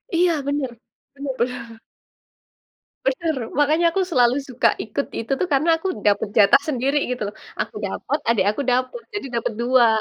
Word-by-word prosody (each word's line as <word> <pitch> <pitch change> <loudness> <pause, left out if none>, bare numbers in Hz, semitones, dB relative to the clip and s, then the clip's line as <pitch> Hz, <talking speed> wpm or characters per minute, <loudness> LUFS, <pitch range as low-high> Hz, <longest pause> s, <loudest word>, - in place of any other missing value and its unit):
Iya, 350 +1 +4 0.2
bener. 285 -2 -1 0.5
Bener 280 -1 -4
bener. 235 -2 -3 1.3
Benar, 315 +4 0 0.2
makanya 310 +4 +3
aku 385 - 0
selalu 245 -3 +4
suka 255 -2 +2 0.2
ikut 230 +6 -3
itu 230 +4 -5
tuh, 370 - 0
karena 290 +5 +2
aku 355 +4 -4 0.2
dapat 205 +1 +3
jatah 215 +7 +7
sendiri 275 0 0
gitu, 250 - -4
loh. 210 - -15 0.3
Aku - - -5
dapat, 270 +9 -2
adik 230 -3 +3
aku 215 - -2
dapat, 255 - 0
jadi 410 -9 -4
dapat 225 - -3
2, 245 -1 +5
265 Hz, 160 wpm, -22 LUFS, 240-295 Hz, 1.3 s, jatah